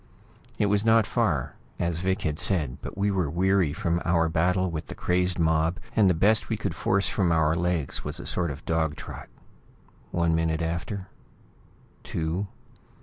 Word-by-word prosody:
It - - +2
was 100 0 +2
not 115 -1 +5
far, - - 0 0.2
as 85 -1 -1
Vic 95 +3 -1
had 75 -3 -1
said, 75 -10 +1
but - - -8
we 100 +1 +1
were 90 -6 0
weary 95 0 +2
from 85 +3 -1
our 85 -1 +2
battle 90 +3 +1
with 80 -1 -5
the - - -7
crazed 90 0 0
mob, 80 +1 +2 0.2
and 105 -4 +5
the 90 - +3
best 105 +6 +3
we - - 0
could - - -3
force 100 +1 +1
from 90 -5 +1
our 80 -1 +3
legs 85 -4 -1
was 75 +3 -3
a - - -7
sort 85 -2 0
of 70 - -8
dog 80 -2 0
trot. - - -9 0.8
One 85 -1 +1
minute 80 0 0
after... 85 +4 -3 1.0
two.... 85 +5 -2
85 Hz, 175 wpm, -26 LUFS, 80-95 Hz, 1.0 s, not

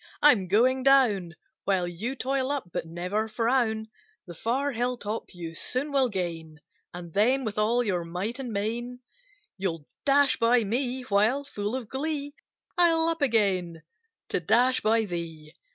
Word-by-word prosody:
I'm 240 -11 +5
going 250 +7 +3
down, 230 -11 +3 0.3
While 185 -3 +1
you 210 +10 -4
toil 265 0 -1
up; 275 -11 -3
but - - -3
never 180 +6 -2
frown; 225 -1 0 0.4
The 175 - -9
far 255 - -1
hill 245 +1 -1
top 215 0 -4
you 170 -3 -7
soon 260 - -3
will 270 -3 +3
gain, 165 -5 -4 0.3
And 175 -2 -9
then, 250 +6 +3
with 215 -2 -3
all 235 +3 +2
your 185 -6 -1
might 185 +9 -4
and 255 -3 -5
main, 235 +4 -3 0.6
You'll 165 -6 -3 0.2
dash 280 0 +4
by 235 0 +3
me; 250 +4 -2
while, 225 +5 +2
full 210 -4 -4
of 255 -4 -5
glee, 285 +2 -3 0.5
I'll 330 -1 +4
up 330 -1 -3
again 190 - +1 0.5
to - - 0
dash 240 +8 +3
by 220 +1 +2
thee! 165 -4 -6
225 Hz, 155 wpm, -27 LUFS, 185-260 Hz, 0.6 s, I'm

